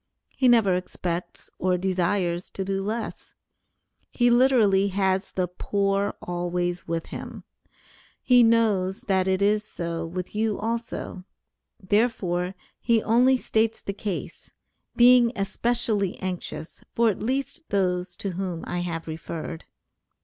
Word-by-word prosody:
He 260 - +3
never 225 -6 +5
expects 180 -1 -4
or 185 0 +2
desires 180 -1 0
to 190 - -2
do 195 0 -1
less; 220 +2 -5 0.7
he 240 -1 +2
literally 235 -6 +4
has 190 0 0
the 185 -1 -1
poor 195 +2 -1
always 175 0 -2
with 165 0 -2
him. - - -7 0.8
He 250 -1 +6
knows 215 -5 +2
that 190 -2 +1
it 190 +1 +1
is 210 +1 +3
so 170 -4 -4
with 180 +2 -5
you 215 -1 0
also, 230 -4 -4 0.6
therefore, 190 -3 0 0.2
he 230 -2 +2
only 250 +4 +4
states 225 -2 0
the 200 - -5
case, 200 -1 -5 0.5
being 245 -1 +6
especially 210 -1 0
anxious 180 -3 -6
for 230 -1 +4
at - - -7
least 265 +6 -3
those 180 -2 0
to 200 - -4
whom 180 -2 -4
I 175 - -3
have 170 -2 -3
referred. 160 0 -6
195 Hz, 130 wpm, -25 LUFS, 180-225 Hz, 0.8 s, He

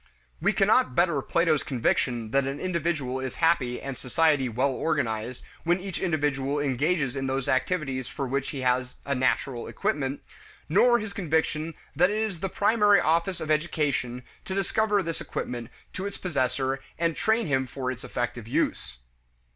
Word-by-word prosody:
We - - +3
cannot 125 - +3
better 170 -5 +3
Plato's 165 0 +2
conviction 120 -2 0
that 135 0 +2
an 135 +1 -3
individual 165 -7 -1
is 130 -2 -4
happy 150 -7 +2
and 135 -1 -5
society 135 +1 +2
well 130 +4 +1
organized 125 -6 -1 0.2
when 175 +2 +2
each 190 -1 -5
individual 145 -5 0
engages 145 +1 0
in 135 -1 -2
those 135 0 -1
activities 130 -1 0
for 140 - -4
which 135 +1 -1
he 140 - -4
has 125 0 +1
a 140 - 0
natural 130 -1 0
equipment, 145 -10 -2 0.4
nor 235 +8 +5
his 215 -3 -5
conviction 160 -3 -1 0.2
that 180 +5 +4
it 210 - -1
is 215 -6 -2
the 195 - -2
primary 205 +1 +4
office 170 +3 +1
of 155 - -2
education 145 -6 0 0.2
to 190 - -3
discover 205 +1 +1
this 165 -1 -4
equipment 120 -1 -4 0.2
to 190 +2 -3
its 200 - -7
possessor 135 -5 -1 0.2
and 165 -1 +1
train 220 +2 +2
him 135 -4 +1
for 130 +1 -3
its 125 -1 -8
effective 120 -2 -3
use. 65 - -1
145 Hz, 165 wpm, -27 LUFS, 130-170 Hz, 0.4 s, nor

